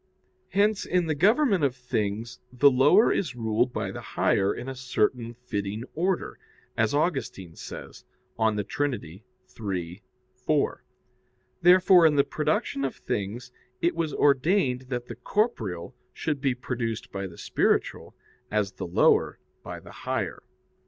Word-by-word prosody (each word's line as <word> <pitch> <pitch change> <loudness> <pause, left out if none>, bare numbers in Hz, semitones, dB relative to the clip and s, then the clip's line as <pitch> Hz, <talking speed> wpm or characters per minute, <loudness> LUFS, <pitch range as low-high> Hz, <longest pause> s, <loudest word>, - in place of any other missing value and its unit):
Hence 205 +1 +2
in 180 -1 +1
the 160 - 0
government 205 - +3
of 135 -3 +2
things 115 -2 -3
the 140 +3 +5
lower 145 - +5
is 145 -10 -2
ruled 115 +1 0
by - - -3
the - - -7
higher 100 0 +1
in 125 - -6
a 135 - -3
certain 125 -2 -1
fitting 105 -3 -4
order, 180 +3 -1 0.4
as 110 +4 +1
Augustine 135 - -2
says - - -9 0.4
(De 110 -2 +2
Trin. 145 +5 -1
iii, 95 -2 -7 0.3
4). 130 +4 -1 0.8
Therefore 180 0 +7
in 150 - +2
the 140 - +5
production 140 -2 -1
of 135 - -2
things 115 +5 -4 0.3
it 170 - +1
was 165 -2 -1
ordained 140 -2 +2
that 120 -2 -3
the 120 - -8
corporeal 115 - -2 0.2
should 150 -4 -3
be 135 -3 +1
produced 115 -3 -4
by 100 0 -4
the 85 - -13
spiritual, - - 0 0.3
as 105 -2 0
the 95 - -6
lower 85 - +3 0.2
by - - -7
the - - -13
higher. - - -3
125 Hz, 140 wpm, -26 LUFS, 110-150 Hz, 0.8 s, Therefore